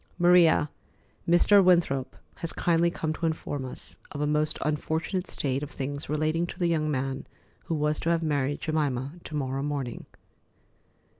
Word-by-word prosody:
"Maria, 175 Hz, -4 st, +5 dB, 0.6 s
Mr. 195 Hz, +4 st, +6 dB
Winthrop 170 Hz, -8 st, +2 dB, 0.2 s
has 165 Hz, -, -4 dB
kindly 170 Hz, 0 st, +2 dB
come 160 Hz, -2 st, -2 dB
to 165 Hz, +1 st, -1 dB
inform 145 Hz, -3 st, -3 dB
us 130 Hz, -, -9 dB
of 145 Hz, -, -6 dB
a 150 Hz, -, +1 dB
most 150 Hz, +1 st, +1 dB
unfortunate 160 Hz, +4 st, -1 dB
state 135 Hz, -1 st, -2 dB
of 150 Hz, -, -5 dB
things 140 Hz, 0 st, -5 dB
relating 155 Hz, +3 st, 0 dB
to -, -, -8 dB
the 180 Hz, -, 0 dB
young 160 Hz, -3 st, +1 dB
man 135 Hz, -1 st, -2 dB, 0.4 s
who 165 Hz, -, -1 dB
was 150 Hz, 0 st, 0 dB
to 165 Hz, -, -1 dB
have 165 Hz, -1 st, +2 dB
married 145 Hz, -2 st, 0 dB
Jemima 145 Hz, -1 st, -1 dB
to 155 Hz, -, -7 dB
morrow 135 Hz, -1 st, -2 dB
morning." 140 Hz, -4 st, -4 dB
155 Hz, 160 wpm, -27 LUFS, 140-165 Hz, 0.6 s, Mr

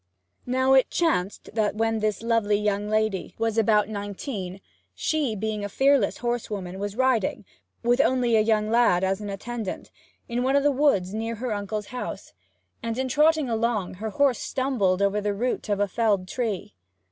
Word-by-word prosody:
Now 260 Hz, +1 st, +3 dB
it 265 Hz, -1 st, +5 dB
chanced 210 Hz, -, -1 dB
that 215 Hz, -1 st, 0 dB
when 225 Hz, 0 st, 0 dB
this 215 Hz, 0 st, -1 dB
lovely 230 Hz, -3 st, +2 dB
young 210 Hz, 0 st, -1 dB
lady 215 Hz, -3 st, -1 dB
was 225 Hz, -1 st, 0 dB
about 215 Hz, -2 st, +3 dB
nineteen, 200 Hz, -2 st, -5 dB, 0.4 s
she 295 Hz, -8 st, 0 dB
(being 215 Hz, 0 st, -3 dB
a 205 Hz, -, -3 dB
fearless 270 Hz, -2 st, +3 dB
horsewoman) 210 Hz, -6 st, -3 dB
was 205 Hz, 0 st, -4 dB
riding, 255 Hz, -6 st, +1 dB, 0.4 s
with 245 Hz, +3 st, +4 dB
only 250 Hz, -4 st, +2 dB
a 220 Hz, -, +5 dB
young 215 Hz, 0 st, +1 dB
lad 230 Hz, -6 st, +4 dB
as 190 Hz, +2 st, 0 dB
an 205 Hz, -, -5 dB
attendant, 215 Hz, +1 st, -5 dB, 0.4 s
in 240 Hz, 0 st, -1 dB
one 265 Hz, +2 st, +2 dB
o' -, -, +6 dB
the 290 Hz, +1 st, +3 dB
woods 255 Hz, -10 st, +2 dB
near 225 Hz, +1 st, -3 dB
her 235 Hz, 0 st, -3 dB
uncle's 205 Hz, 0 st, -4 dB
house, 250 Hz, -, -6 dB, 0.5 s
and, 230 Hz, 0 st, -3 dB
in 260 Hz, 0 st, -1 dB
trotting 305 Hz, +2 st, +3 dB
along, 225 Hz, -4 st, -1 dB
her 220 Hz, -, -2 dB
horse 265 Hz, +2 st, +2 dB
stumbled 205 Hz, -8 st, 0 dB
over 200 Hz, +1 st, +1 dB
the 205 Hz, 0 st, -1 dB
root 240 Hz, +1 st, -2 dB
of 205 Hz, -1 st, +1 dB
a 205 Hz, -, +2 dB
felled 200 Hz, -2 st, +1 dB
tree. 220 Hz, -3 st, -3 dB
220 Hz, 175 wpm, -25 LUFS, 205-245 Hz, 0.5 s, o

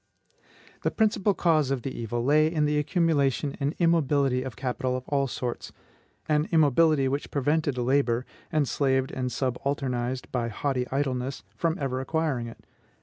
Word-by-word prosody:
The -, -, +1 dB
principal 210 Hz, -2 st, +1 dB
cause 155 Hz, -5 st, +2 dB
of 135 Hz, -3 st, -1 dB
the 135 Hz, -, -3 dB
evil 120 Hz, +1 st, -3 dB
lay 155 Hz, +3 st, +4 dB
in 155 Hz, -3 st, +1 dB
the 150 Hz, 0 st, +1 dB
accumulation 150 Hz, -4 st, +1 dB
and 140 Hz, +3 st, -1 dB
immobility 145 Hz, -6 st, +2 dB
of 130 Hz, -4 st, -6 dB
capital 130 Hz, +1 st, -2 dB
of 130 Hz, -, -9 dB
all 140 Hz, -1 st, +1 dB
sorts, 120 Hz, -1 st, -4 dB, 0.6 s
an 150 Hz, 0 st, +1 dB
immobility 155 Hz, -2 st, +4 dB
which 140 Hz, +2 st, -2 dB
prevented 145 Hz, 0 st, 0 dB
labor, 125 Hz, -1 st, +1 dB, 0.3 s
enslaved 135 Hz, -3 st, +1 dB
and 125 Hz, -1 st, -2 dB
subalternized 130 Hz, -1 st, -2 dB
by 120 Hz, -2 st, -1 dB
haughty 125 Hz, +2 st, -2 dB
idleness, 135 Hz, -1 st, -2 dB
from 165 Hz, 0 st, 0 dB
ever 130 Hz, -2 st, -2 dB
acquiring 145 Hz, -4 st, -1 dB
it. 115 Hz, -, -12 dB
140 Hz, 145 wpm, -27 LUFS, 130-155 Hz, 0.6 s, lay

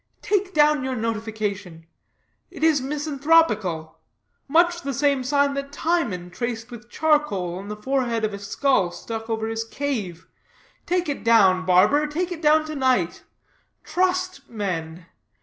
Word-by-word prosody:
Take 400 Hz, -2 st, 0 dB
down 300 Hz, -2 st, +4 dB
your 260 Hz, 0 st, -2 dB
notification; 215 Hz, -6 st, -4 dB, 0.6 s
it -, -, -8 dB
is 315 Hz, -4 st, +4 dB
misanthropical; 275 Hz, -, +1 dB, 0.5 s
much 345 Hz, +4 st, +3 dB
the 275 Hz, -1 st, -4 dB
same 280 Hz, -1 st, +1 dB
sign 280 Hz, +1 st, +2 dB
that 280 Hz, 0 st, -5 dB
Timon 265 Hz, -, -1 dB
traced 235 Hz, +3 st, -4 dB
with 240 Hz, 0 st, -11 dB
charcoal 240 Hz, -, 0 dB
on 195 Hz, -, -9 dB
the 210 Hz, -, -5 dB
forehead 235 Hz, -1 st, -1 dB
of 215 Hz, -, -3 dB
a 200 Hz, -, -6 dB
skull 205 Hz, -1 st, +1 dB
stuck 225 Hz, +6 st, -7 dB
over 220 Hz, -1 st, -1 dB
his 225 Hz, 0 st, -2 dB
cave. 225 Hz, -9 st, -4 dB, 0.6 s
Take 360 Hz, -1 st, 0 dB
it 285 Hz, -, -3 dB
down, 190 Hz, -5 st, +4 dB
barber; 210 Hz, +12 st, +4 dB
take 345 Hz, +5 st, -3 dB
it 335 Hz, -2 st, -6 dB
down 310 Hz, 0 st, +4 dB
to 310 Hz, 0 st, -6 dB
night. 255 Hz, -, +1 dB, 0.6 s
Trust 370 Hz, -4 st, -1 dB
men. 175 Hz, -6 st, -4 dB
255 Hz, 145 wpm, -23 LUFS, 205-300 Hz, 0.6 s, down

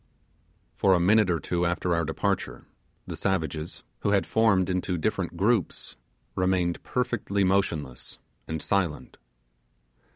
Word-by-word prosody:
For 95 Hz, -2 st, +3 dB
a -, -, +2 dB
minute 105 Hz, +3 st, +4 dB
or 85 Hz, -2 st, +1 dB
two 85 Hz, +2 st, -1 dB
after 85 Hz, 0 st, 0 dB
our 85 Hz, 0 st, +1 dB
departure, 95 Hz, +5 st, -2 dB, 0.4 s
the -, -, -6 dB
savages, 80 Hz, -4 st, -2 dB, 0.2 s
who -, -, 0 dB
had 100 Hz, -4 st, +3 dB
formed 105 Hz, -5 st, +3 dB
into 90 Hz, -1 st, -1 dB
different 80 Hz, -, -2 dB
groups, 105 Hz, -1 st, 0 dB, 0.4 s
remained 90 Hz, -2 st, +1 dB
perfectly 120 Hz, -5 st, -1 dB
motionless 80 Hz, -10 st, -1 dB, 0.3 s
and 80 Hz, -1 st, -4 dB
silent. 90 Hz, -7 st, -1 dB
90 Hz, 125 wpm, -27 LUFS, 85-100 Hz, 0.4 s, minute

